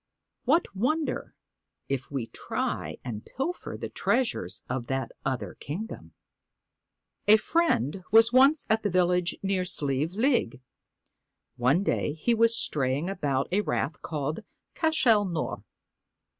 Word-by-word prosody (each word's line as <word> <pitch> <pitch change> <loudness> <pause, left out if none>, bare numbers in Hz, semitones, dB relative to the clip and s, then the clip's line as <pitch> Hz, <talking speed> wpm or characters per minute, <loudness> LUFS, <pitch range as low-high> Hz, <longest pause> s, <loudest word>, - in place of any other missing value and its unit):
What 295 - +2
wonder 300 +10 -1 0.5
if 135 -2 -3
we 135 -5 -3
try - - -4
and 110 -4 -5
pilfer 335 +7 -4
the - - -4
treasures 255 -2 -1
of 125 -1 -3
that 135 -2 -2
other 130 -2 -3
kingdom! 195 +10 -7 1.1
A 215 +1 +8
friend 195 - 0
was 225 +2 +6
once 275 +4 +5
at 220 0 +1
a 205 - +1
village 180 -1 +1
near 190 -1 0
Sleive 150 -2 +1
League. 230 - +1 1.0
One 130 +10 +2
day 150 - 0
he 160 +10 0
was 230 0 +4
straying 140 +5 0
about 140 -8 -1
a 200 +3 +2
rath 155 -6 -2
called 155 +4 -3 0.2
' - - -56
Cashel 260 -10 +4
Nore.' 170 -4 -3
185 Hz, 130 wpm, -27 LUFS, 140-230 Hz, 1.1 s, A